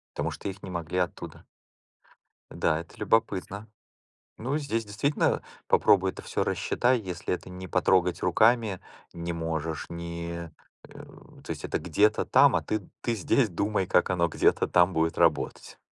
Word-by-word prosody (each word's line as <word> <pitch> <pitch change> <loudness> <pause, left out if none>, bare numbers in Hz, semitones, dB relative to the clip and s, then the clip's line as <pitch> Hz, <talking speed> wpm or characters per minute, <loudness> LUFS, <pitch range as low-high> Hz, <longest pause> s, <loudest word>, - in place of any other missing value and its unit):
Потому - - -2
что - - -7
их 100 0 -7
не 95 - -7
могли 85 0 -4
оттуда 90 -1 -4 1.1
Да, 80 - 0
это 85 - -15
любопытно. 105 -1 0 0.7
Ну, 130 +6 -2
здесь 115 -7 -2
действительно 105 +9 0 0.3
попробуй 95 -1 +4
это - - -10
всё - - -1
рассчитай, 125 0 +1
если 90 -5 -4
это 90 - -6
не 95 +1 -8
потрогать 90 +1 +2
руками 110 +1 +3 0.3
не 85 0 -4
можешь, 80 -1 -3
не, 85 0 -6 0.4
э, - - -12 0.4
то - - -15
есть - - -6
это - - -1
где-то 105 +6 +2
там, - - +5
а - - 0
ты, 110 -1 -2 0.2
ты 120 - -1
здесь 110 +3 +2
думай, 100 +3 -1
как 90 - +2
оно 85 -2 +2
где-то 85 - +2
там 90 +1 +4
будет 80 0 0
работать. 85 -3 0
90 Hz, 155 wpm, -27 LUFS, 85-105 Hz, 1.1 s, там